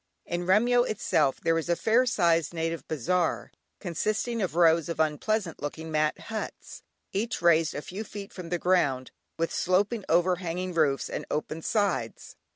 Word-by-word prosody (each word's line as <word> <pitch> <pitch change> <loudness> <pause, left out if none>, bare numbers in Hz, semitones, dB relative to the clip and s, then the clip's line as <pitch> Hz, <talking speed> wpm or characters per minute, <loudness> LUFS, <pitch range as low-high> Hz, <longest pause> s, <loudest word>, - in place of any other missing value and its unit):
In 175 0 -3
Remyo 240 +6 +4
itself 215 - +1
there 165 0 +2
is 165 - -6
a 170 - +3
fair 235 +7 +2
sized 170 -6 +2
native 165 0 -3
bazaar, 160 +4 -1 0.3
consisting 215 +6 -2
of 185 -4 -2
rows 165 -1 +4
of 165 - -4
unpleasant 165 +4 0
looking 160 +2 -5
mat 155 0 +1
huts, 220 -1 -6 0.3
each 225 +5 -1
raised 165 -2 +3
a 150 - -4
few 195 +4 -6
feet 205 -1 -9
from 180 -3 -8
the 175 - 0
ground, 145 -8 +1 0.3
with 165 0 -1
sloping 200 +5 +1
overhanging 180 +1 +1
roofs, 150 -5 +1
and - - -5
open 155 +1 -3
sides. 190 - -1
175 Hz, 160 wpm, -27 LUFS, 160-200 Hz, 0.3 s, Remyo